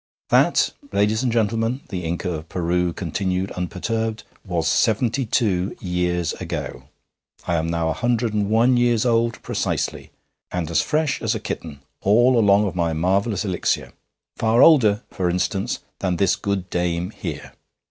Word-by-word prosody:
'That, - - +4 0.2
ladies 105 +2 +2
and 130 -2 0
gentlemen,' 115 +3 0
the 90 -4 -4
Inca 85 +2 -2
of 80 0 -7
Peru 90 0 0
continued 95 +2 -2
unperturbed, 110 +4 -3 0.2
'was 85 -4 -1
seventy 115 +7 +1
two 95 -5 0
years 90 -2 -1
ago. 60 +1 -5 0.6
I 85 - -1
am 80 0 0
now 85 -1 0
a - - 0
hundred 120 0 0
and 105 -1 0
one 120 +3 +4
years 120 -1 +2
old 115 -1 +1
precisely, - - -2 0.4
and 85 -3 -3
as 80 - +3
fresh 155 -2 0
as - - 0
a - - -2
kitten, 75 -4 -6 0.2
all 120 +6 +4
along 105 -2 +4
of 95 - -3
my 85 -2 0
marvellous 95 +5 0
elixir. 95 -3 -1 0.4
Far 115 +3 +4
older, 115 -9 +5
for 90 -2 -1
instance, 95 +5 -1 0.2
than 95 -2 0
this 95 0 +2
good 100 -2 -3
dame 90 +1 -1
here.' - - -7
100 Hz, 155 wpm, -22 LUFS, 90-115 Hz, 0.6 s, older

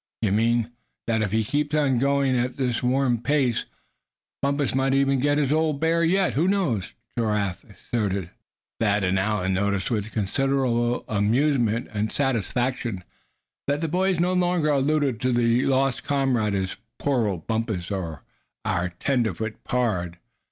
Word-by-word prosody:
"You 105 - +2
mean 115 +2 +2 0.2
" - - -54
"That 110 -1 +1
if 105 -3 -1
he 110 +1 +2
keeps 145 +6 -1
on 135 -5 +2
going 140 0 +2
at 125 +1 -1
this 125 -4 0
warm 125 -2 +1
pace, 135 -3 +1 0.8
Bumpus 140 0 0
might 135 +1 +2
even 135 -1 +2
get 145 +2 +2
his 145 -1 +2
old 155 -2 +1
bear 165 +1 +2
yet, 185 +3 +2
who 160 +6 +2
knows," 175 - 0 0.2
Giraffe 105 -5 -1
asserted. 100 -4 -3 0.5
Thad 105 -2 +2
and 95 +1 +1
Allan 95 -2 0
noticed 100 +2 0
with 110 -1 -1
considerable 120 +2 0
amusement 115 +2 +1
and 105 +1 -1
satisfaction 125 -5 -1 0.6
that 145 +1 +1
the 165 - 0
boys 185 +2 +1
no 180 +2 +2
longer 175 -3 +1
alluded 140 -3 +1
to 130 - +1
the 120 +1 +2
lost 135 -1 +1
comrade 135 -8 +1
as 95 -1 -2 0.2
"poor 130 -6 +1
old 90 -6 -4
Bumpus," 110 -5 -2
and 85 -6 -3 0.5
"our 90 +1 0
tenderfoot 110 -4 -1
pard." 90 -9 -1
120 Hz, 150 wpm, -24 LUFS, 105-140 Hz, 0.8 s, You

